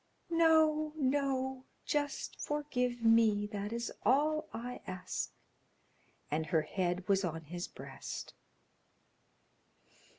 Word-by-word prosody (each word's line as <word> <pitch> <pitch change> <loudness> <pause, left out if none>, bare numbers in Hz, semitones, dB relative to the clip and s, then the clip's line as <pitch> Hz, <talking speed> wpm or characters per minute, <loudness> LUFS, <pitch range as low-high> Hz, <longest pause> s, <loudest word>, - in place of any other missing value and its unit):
"No, 315 -2 +4
no; 265 -2 0 0.2
just 290 -1 -2
forgive 250 -5 -1
me; 225 -2 +5
that 205 0 -4
is 235 0 -3
all 305 +6 +3
I 245 +2 -5
ask," 185 0 -3 1.0
and 155 +1 0
her 160 -2 +2
head 180 +2 -1
was 195 0 +3
on 165 -2 -2
his 175 +3 -5
breast. - - -7
240 Hz, 100 wpm, -34 LUFS, 195-290 Hz, 1.0 s, me